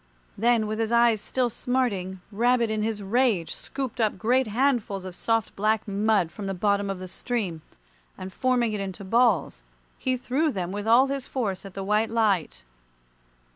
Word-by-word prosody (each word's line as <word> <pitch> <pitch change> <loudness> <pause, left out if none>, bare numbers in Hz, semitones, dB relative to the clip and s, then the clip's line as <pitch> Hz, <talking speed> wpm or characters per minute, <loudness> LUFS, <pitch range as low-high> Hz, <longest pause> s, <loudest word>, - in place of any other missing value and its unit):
Then, 230 0 +2
with 215 +1 -3
his 225 0 -1
eyes 235 -2 +4
still 250 -2 -1
smarting, 205 -8 -1
Rabbit 235 +1 +2
in 215 0 -1
his 215 -1 -2
rage 215 -4 +1
scooped 260 -3 -4
up 215 -3 +1
great 245 +6 +2
handfuls 225 -5 0
of 185 - -6
soft 225 +3 -1
black 215 +2 +1
mud 200 -3 +1
from 205 -2 -6
the 195 - -2
bottom 200 +1 +1
of 195 - -3
the 185 0 -7
stream, 190 -5 -3 0.6
and 185 0 -8
forming 245 -3 +1
it 210 - -2
into 195 0 -5
balls, 200 - +2 0.4
he 255 -1 0
threw 280 +6 0
them 185 -5 -3
with 205 +2 -4
all 240 +4 +6
his 275 -1 -3
force 205 -8 -3
at 195 - -10
the 195 - -4
white 210 +3 +1
light. 200 - 0
215 Hz, 175 wpm, -26 LUFS, 195-240 Hz, 0.6 s, all